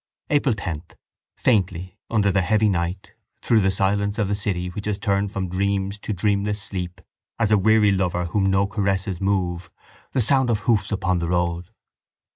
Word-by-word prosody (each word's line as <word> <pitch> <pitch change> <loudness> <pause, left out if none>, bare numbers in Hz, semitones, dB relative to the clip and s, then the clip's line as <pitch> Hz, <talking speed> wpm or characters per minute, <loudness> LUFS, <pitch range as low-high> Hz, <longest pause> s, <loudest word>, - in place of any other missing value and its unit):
April 140 -5 +2
10. 85 -7 -4 0.6
Faintly, 95 -4 0
under 105 -3 +2
the 95 0 +2
heavy 110 +2 +2
night, 90 0 -2 0.3
through 115 - +4
the 95 -2 +2
silence 100 +2 0
of 105 -3 +1
the 100 - -1
city 95 -3 -2
which 105 +4 -6
has 105 -2 -1
turned 100 -1 0
from 95 -2 -3
dreams 100 +2 -1
to 110 - -5
dreamless 105 +1 0
sleep 90 -4 -5 0.4
as 110 -2 +1
a 105 - +6
weary 110 +1 +4
lover 90 -2 0
whom 95 +3 +1
no 95 +1 +3
caresses 100 -2 -1
move, 95 -3 -1 0.4
the - - +1
sound 130 +2 +3
of 110 -3 +1
hoofs 105 -2 +1
upon 95 -3 0
the 85 - -2
road. 85 -1 -1
100 Hz, 175 wpm, -23 LUFS, 90-105 Hz, 0.6 s, a